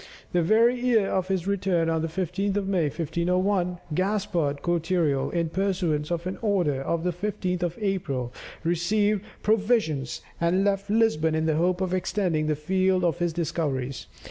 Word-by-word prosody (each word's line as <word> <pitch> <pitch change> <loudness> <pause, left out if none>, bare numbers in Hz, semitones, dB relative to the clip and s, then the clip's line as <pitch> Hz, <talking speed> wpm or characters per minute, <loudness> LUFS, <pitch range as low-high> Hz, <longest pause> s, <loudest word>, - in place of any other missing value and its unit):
The 175 - +3
very 230 +8 +4
year 235 -5 +2
of 185 -1 0
his 190 -2 -1
return, 185 -4 +1
on 165 -1 +1
the 165 - -1
15th 190 +4 -1
of 200 -1 -1
May, 185 -5 +1
1501, 180 +4 0 0.2
Gaspard 185 -6 0
Cortereal, 165 -5 +1
in 170 -2 0
pursuance 175 -5 0
of 170 0 -2
an 185 +1 -4
order 180 - +1
of 165 +4 -1
the 180 - +1
15th 180 -1 -2
of 175 -1 -2
April, 165 - -2 0.3
received 200 +5 +1 0.2
provisions, 210 - +1 0.2
and 175 +3 +2
left 200 0 0
Lisbon 205 -8 +2
in 160 0 0
the 155 -1 +1
hope 180 +2 +1
of 185 -1 -1
extending 180 -4 0
the 155 - +1
field 185 +4 +1
of 170 -5 +1
his 175 -1 +1
discoveries. 140 -6 -2
180 Hz, 165 wpm, -26 LUFS, 160-195 Hz, 0.3 s, very